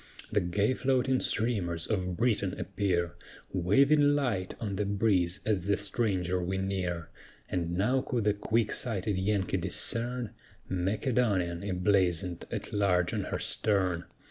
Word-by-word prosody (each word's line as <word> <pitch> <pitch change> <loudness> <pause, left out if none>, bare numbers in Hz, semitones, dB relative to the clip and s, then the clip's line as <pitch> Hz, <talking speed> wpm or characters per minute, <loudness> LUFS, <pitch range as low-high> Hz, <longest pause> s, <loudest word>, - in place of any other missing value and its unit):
The - - +2
gay 100 +7 +1
floating 130 0 +1
streamers 95 -8 0
of 90 -4 -2
Britain 105 -6 0
appear, 90 -2 -1 0.4
Waving 140 - +4
light 115 -10 -1
on 105 -4 -3
the 105 - +1
breeze 100 -3 +1
as 100 -4 0
the 100 - +3
stranger 95 -4 -1
we 95 +2 -2
near; 95 -4 -2 0.4
And 85 -1 -2
now 125 +7 +2
could 120 -3 -2
the 105 0 +3
quick 110 +2 0
sighted 105 -4 -1
Yankee 95 -1 0
discern 120 0 0 0.4
"Macedonian," 95 -2 0
emblazoned 90 -2 +1
at - - -5
large 90 -4 +2
on - - -1
her - - -2
stern. 95 -5 0
100 Hz, 135 wpm, -30 LUFS, 90-110 Hz, 0.4 s, Waving